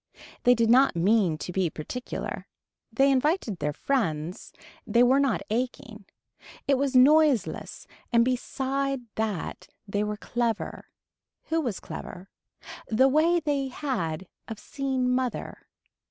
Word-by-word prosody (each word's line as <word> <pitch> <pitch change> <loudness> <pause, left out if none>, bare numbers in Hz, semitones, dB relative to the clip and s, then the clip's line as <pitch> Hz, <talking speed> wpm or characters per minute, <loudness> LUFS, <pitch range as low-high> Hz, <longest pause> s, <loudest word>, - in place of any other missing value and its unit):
They 245 0 +7
did 230 -1 +2
not 260 -3 +5
mean 185 -2 +2
to 180 - -6
be 185 -1 0
particular. 245 +12 -6 0.4
They 275 0 +3
invited 270 - 0
their 150 - -1
friends. 165 - -2 0.4
They 240 +1 +4
were 260 +3 +4
not 280 -1 +1
aching. 230 -3 -3 0.6
It 275 -2 +3
was 275 -1 0
noiseless 285 0 +3 0.3
and 235 0 +4
beside 270 +1 -1
that 215 -5 -3 0.2
they 205 +1 -1
were 210 0 -3
clever. 235 0 -3 0.6
Who 325 0 +1
was 240 -10 -3
clever. 185 +2 -9 0.6
The 245 +4 +4
way 325 +5 +3
they 285 -3 -1
had 190 - -3 0.2
of 225 - -6
seeing 265 +2 -2
mother. 250 -1 -2
245 Hz, 125 wpm, -27 LUFS, 210-275 Hz, 0.6 s, They